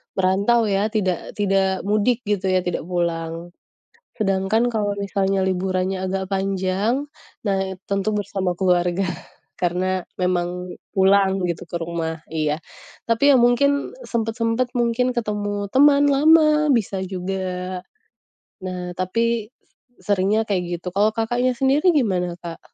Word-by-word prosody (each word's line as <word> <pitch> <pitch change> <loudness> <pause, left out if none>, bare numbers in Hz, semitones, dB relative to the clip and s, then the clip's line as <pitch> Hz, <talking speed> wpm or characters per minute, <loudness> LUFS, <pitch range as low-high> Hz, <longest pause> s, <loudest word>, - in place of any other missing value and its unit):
merantau 200 +5 +3
ya 200 +1 +1
tidak 190 -5 -2
tidak 195 -1 +1
mudik 215 +3 +2
gitu 200 -2 0
ya 185 - +3
tidak 180 - -2
pulang. 170 -1 -2 0.6
Sedangkan 210 +2 +1
kalau 210 -3 -1
misalnya 195 -1 0
liburannya 185 0 -1
agak 190 0 -3
panjang, 195 +7 0 0.4
nah 195 -2 +1 0.3
tentu 200 +2 0
bersama 195 -3 -1
keluarga 180 0 +1 0.5
karena 185 +1 0 0.2
memang 180 0 -1 0.2
pulang 195 0 +3
gitu 170 -2 -3
ke 175 - -8
rumah. 165 -1 -3
Iya. 155 -1 -1 0.5
Tapi 255 +5 +4
ya - - +6
mungkin 280 - +2
sempat-sempat 230 +2 -1
mungkin 245 +1 +1
ketemu 205 -3 -2
teman 285 +1 +5
lama 305 +1 +5
bisa 200 -4 -1
juga. 185 0 -4 0.8
Nah, 180 -1 -5
tapi 230 +4 0 0.6
seringnya 205 +2 +2
kayak 190 -4 0 0.2
gitu. 180 - -11
Kalau 205 +4 +3
Kakaknya 240 +3 0
sendiri 275 +8 +3
gimana 180 -9 +1
Kak? 170 -1 -8
195 Hz, 120 wpm, -22 LUFS, 185-230 Hz, 0.8 s, ya